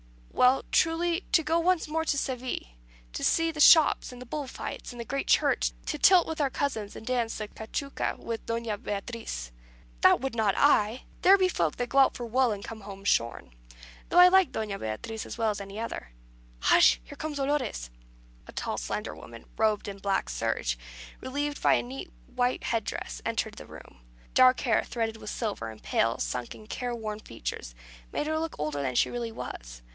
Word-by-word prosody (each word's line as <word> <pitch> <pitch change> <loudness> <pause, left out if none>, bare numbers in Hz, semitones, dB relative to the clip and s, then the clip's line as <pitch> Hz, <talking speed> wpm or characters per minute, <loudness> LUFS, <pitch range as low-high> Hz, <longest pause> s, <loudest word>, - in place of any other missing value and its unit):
"Well, 255 +1 +4
truly, 335 +2 +2
to 320 - +5
go 325 +2 +2
once 355 -1 +2
more 320 +1 -1
to 285 - +1
Seville, 255 -2 -3 0.5
to - - -4
see 330 0 +2
the 310 - -9
shops, 315 -2 +6
and 250 - -10
the 250 - -9
bull 285 +3 -4
fights, - - -6
and 240 - -11
the 235 - -4
great 275 +4 -3
Church; - - +3
to 300 - -3
tilt 365 +1 +7
with 320 -1 -3
our 280 - +2
cousins, 225 -7 -3
and - - -9
dance 240 -2 -1
the 215 - -4
cachuca 250 +7 -4
with 230 -1 -6
Doña 230 -3 -2
Beatriz." 205 - -5 0.5
"That - - +6
would 270 0 -3
not 220 -4 +1
I. 235 -4 +3 0.2
There 390 +2 +7
be 375 -1 +3
folk 170 - 0
that 245 -1 -3
go 275 - +3
out 270 - +5
for 240 - -5
wool, 250 +1 +2
and 200 -1 -4
come 225 -1 -8
home 195 -1 -9
shorn. 115 - 0 0.6
Though - - 0
I 360 0 +10
like 380 -1 +4
Doña 210 -3 -3
Beatriz 110 - -5
as - - -7
well 225 -2 +2
as 205 -1 -5
any 200 0 -9
one." 225 - -5 0.5
"Hush! 65 - +6
here - - -12
comes 310 -2 -4
Dolores." 270 - -1 0.6
A - - -9
tall, - - -3
slender - - -4
woman, 115 +8 -12
robed 215 -2 +1
in 200 -1 -6
black 195 -1 0
serge, 85 - -1 0.4
relieved 290 +2 -3
by 145 - +5
a 120 - 0
neat 130 - -8
white 245 - -1
head 225 -3 -1
dress, - - -5
entered - - -1
the - - -10
room. - - -13 0.3
Dark 255 0 +6
hair, 230 -4 +2
threaded 225 -2 -3
with 210 - -8
silver, 205 - -3
and 110 -1 -12
pale, 115 0 +1
sunken, 125 - -4
care 245 +2 -4
worn 215 -2 -5
features, 115 - -6 0.4
made - - -2
her 315 +1 0
look 325 0 -3
older 150 -1 -2
than 130 -2 -2
she - - +3
really 235 -1 -3
was. - - -8
230 Hz, 200 wpm, -28 LUFS, 200-280 Hz, 0.6 s, I